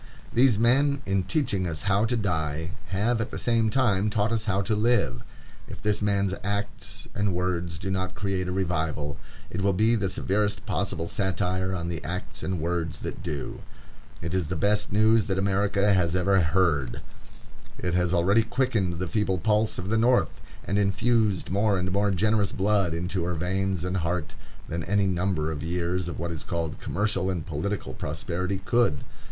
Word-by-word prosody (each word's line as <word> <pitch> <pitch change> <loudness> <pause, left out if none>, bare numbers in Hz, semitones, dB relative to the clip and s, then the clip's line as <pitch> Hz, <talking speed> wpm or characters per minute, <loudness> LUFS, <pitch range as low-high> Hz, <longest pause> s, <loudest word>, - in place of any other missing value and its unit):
These 120 -2 +5
men, 140 +5 +3
in 95 -1 +1
teaching 105 - 0
us 80 -2 -4
how 100 +1 +2
to 120 +1 0
die, 80 -5 -1 0.2
have 110 +5 +1
at 115 - -2
the - - -6
same 115 -2 +2
time 105 -5 +2
taught 105 0 +1
us 115 -1 -1
how 100 -2 +1
to 110 +2 0
live. 105 - +2 0.5
If - - -9
this 105 -1 0
man's 100 -2 +1
acts 100 +1 -4
and 100 -3 0
words 90 -2 -1
do 95 +4 -4
not 95 0 -2
create 95 -2 -2
a - - -2
revival, 80 -5 -1 0.3
it 95 - -3
will 100 0 +3
be 110 +5 +3
the 100 -4 +1
severest 100 +1 0
possible 90 -4 -2
satire 95 -1 -1
on 85 -1 -3
the 85 -2 -4
acts 90 +5 -5
and 95 -2 -2
words 85 0 -2
that - - -5
do. 75 -7 -5 0.6
It 85 +1 -3
is 90 -4 0
the 90 - -3
best 105 +4 +1
news 110 +1 +4
that 95 -2 0
America 100 +1 +2
has 90 -2 +2
ever 95 +1 +3
heard. 75 -7 +1 0.8
It 90 - -2
has 90 -1 +2
already 95 +5 +4
quickened 110 -7 0
the 90 +1 -2
feeble 95 0 0
pulse 105 +2 +1
of 90 +1 -4
the 110 +1 +2
North, 120 +2 +2 0.2
and 100 +2 0
infused 105 0 +1
more 100 +1 +2
and 90 0 -1
more 100 +2 +2
generous 105 +1 +1
blood 95 -4 +1
into 90 +1 -2
her 90 0 -1
veins 95 +1 -1
and 90 +1 -1
heart, 85 -1 -2 0.3
than 85 0 -3
any 100 0 +2
number 90 -4 0
of 75 -2 -4
years 85 +2 -1
of - - -5
what 85 0 -3
is 80 - -5
called 85 -4 -3
commercial 100 -1 -1
and 85 -4 -2
political 95 +6 -3
prosperity 90 +5 -3
could. 120 -10 +2
95 Hz, 180 wpm, -26 LUFS, 85-105 Hz, 0.8 s, These